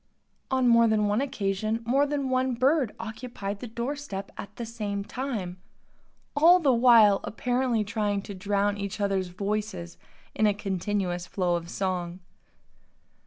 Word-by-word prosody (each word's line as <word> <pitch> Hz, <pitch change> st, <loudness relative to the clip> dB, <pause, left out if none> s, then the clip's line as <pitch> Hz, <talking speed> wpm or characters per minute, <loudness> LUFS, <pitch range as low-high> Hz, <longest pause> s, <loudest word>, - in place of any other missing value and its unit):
On 260 Hz, -1 st, +2 dB
more 235 Hz, -1 st, +6 dB
than 215 Hz, -1 st, +2 dB
one 205 Hz, +4 st, +1 dB
occasion 215 Hz, -3 st, -2 dB
more 275 Hz, +5 st, +3 dB
than 280 Hz, -2 st, -2 dB
one 255 Hz, -1 st, +1 dB
bird 260 Hz, -1 st, +2 dB
occupied 220 Hz, -3 st, -6 dB
the 245 Hz, -, -6 dB
door 235 Hz, +5 st, -3 dB
step 205 Hz, -10 st, -6 dB
at 200 Hz, +1 st, -9 dB
the 235 Hz, -, -5 dB
same 210 Hz, -3 st, -4 dB
time, 210 Hz, -7 st, -4 dB, 0.8 s
all 335 Hz, +5 st, +7 dB
the 280 Hz, -6 st, +3 dB
while 230 Hz, -4 st, +6 dB
apparently 245 Hz, 0 st, 0 dB
trying 205 Hz, -1 st, -1 dB
to 205 Hz, -, -7 dB
drown 200 Hz, +1 st, 0 dB
each 200 Hz, +1 st, -4 dB
others' 195 Hz, -2 st, 0 dB
voices 195 Hz, -2 st, -4 dB, 0.3 s
in 215 Hz, -, +2 dB
a 205 Hz, -, +2 dB
continuous 190 Hz, -2 st, -2 dB
flow 180 Hz, -2 st, 0 dB
of 170 Hz, 0 st, -5 dB
song. 180 Hz, -2 st, -3 dB
210 Hz, 150 wpm, -27 LUFS, 195-245 Hz, 0.8 s, all